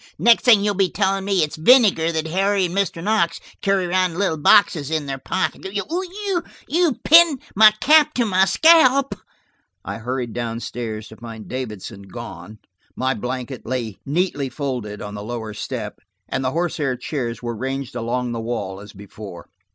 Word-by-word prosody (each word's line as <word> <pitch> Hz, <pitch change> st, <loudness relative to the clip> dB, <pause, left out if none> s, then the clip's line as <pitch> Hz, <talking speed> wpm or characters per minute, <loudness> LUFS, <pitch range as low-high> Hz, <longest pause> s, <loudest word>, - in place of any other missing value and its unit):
"Next 235 Hz, 0 st, +4 dB
thing 220 Hz, -5 st, +6 dB
you'll 205 Hz, 0 st, +1 dB
be 195 Hz, -1 st, +1 dB
telling 195 Hz, -1 st, 0 dB
me 195 Hz, -4 st, +2 dB
it's 150 Hz, -, -4 dB
vinegar 185 Hz, -4 st, +4 dB
that 160 Hz, -1 st, -2 dB
Harry 195 Hz, +3 st, +1 dB
and 175 Hz, +1 st, -5 dB
Mr. 190 Hz, -4 st, -1 dB
Knox 195 Hz, -5 st, +1 dB, 0.2 s
carry 195 Hz, -2 st, +1 dB
around 185 Hz, 0 st, +1 dB
in -, -, -8 dB
little 190 Hz, -4 st, +1 dB
boxes 160 Hz, -2 st, +4 dB
in 160 Hz, -2 st, -1 dB
their 135 Hz, -1 st, -5 dB
pockets. 190 Hz, +5 st, -3 dB, 1.0 s
You've 330 Hz, -4 st, +1 dB
pinned 330 Hz, -4 st, +6 dB, 0.2 s
my 215 Hz, +2 st, +9 dB
cap 305 Hz, 0 st, +5 dB
to 240 Hz, -, +1 dB
my 190 Hz, -2 st, +3 dB
scalp." 275 Hz, -1 st, +5 dB, 0.7 s
I -, -, -5 dB
hurried 125 Hz, 0 st, -4 dB
down 115 Hz, -1 st, -3 dB
stairs 110 Hz, -3 st, -6 dB
to 110 Hz, -, -13 dB
find 115 Hz, -2 st, -10 dB
Davidson 110 Hz, -5 st, -6 dB
gone. 100 Hz, +2 st, -9 dB, 0.4 s
My 130 Hz, +1 st, 0 dB
blanket 125 Hz, 0 st, -5 dB
lay 115 Hz, -4 st, -4 dB
neatly 145 Hz, -2 st, -1 dB
folded, 125 Hz, -8 st, -5 dB
on 105 Hz, -, -7 dB
the 105 Hz, -, -6 dB
lower 110 Hz, -1 st, -5 dB
step, 105 Hz, 0 st, -6 dB, 0.3 s
and 135 Hz, -, -3 dB
the 130 Hz, -, +1 dB
horsehair 155 Hz, -4 st, -1 dB
chairs 125 Hz, -3 st, -4 dB
were 120 Hz, -1 st, -3 dB
ranged 135 Hz, +2 st, -4 dB
along 120 Hz, +1 st, -2 dB
the 115 Hz, -1 st, -4 dB
wall 105 Hz, -5 st, -4 dB
as 105 Hz, +1 st, -12 dB
before. 100 Hz, -3 st, -11 dB
140 Hz, 170 wpm, -21 LUFS, 115-195 Hz, 1.0 s, my